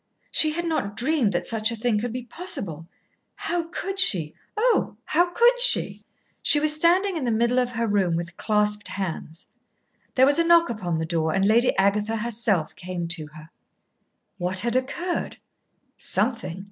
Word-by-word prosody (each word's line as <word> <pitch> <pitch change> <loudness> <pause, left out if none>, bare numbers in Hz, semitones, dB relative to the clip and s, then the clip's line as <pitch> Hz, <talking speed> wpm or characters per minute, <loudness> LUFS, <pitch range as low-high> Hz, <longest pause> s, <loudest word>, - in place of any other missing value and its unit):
She 310 -1 +3
had 345 +2 -3
not 205 -12 -2
dreamed 260 -4 +1
that - - -2
such 225 -1 0
a - - -3
thing 225 -1 0
could 240 +2 -3
be 250 +1 -5
possible. 220 - -4 0.5
How 340 0 -3
could 385 +2 -5
she, 165 - +2 0.2
oh, 475 +2 +1
how 350 +3 +2
could 480 +7 +3
she? - - +4 0.4
She 295 - +4
was 305 0 +4
standing 355 +5 +3
in 305 - -3
the 240 - 0
middle 235 +3 +2
of 250 -1 0
her 230 0 -1
room 195 -5 +1
with 170 0 -5
clasped 210 0 0
hands. 170 -4 -6 0.7
There 260 - +5
was 285 +3 +3
a - - +4
knock 335 -2 +4
upon 180 -7 -3
the 160 - -2
door, 160 -1 -1
and 195 0 +2
Lady 235 +4 +3
Agatha 210 +3 +1
herself 215 -6 -1
came 180 -1 -5
to 165 -3 -2
her. 155 +1 -13 0.9
What 180 +1 0
had 235 +2 -1
occurred? 340 +8 -2 0.6
Something. 190 -4 -1
225 Hz, 170 wpm, -24 LUFS, 185-310 Hz, 0.9 s, There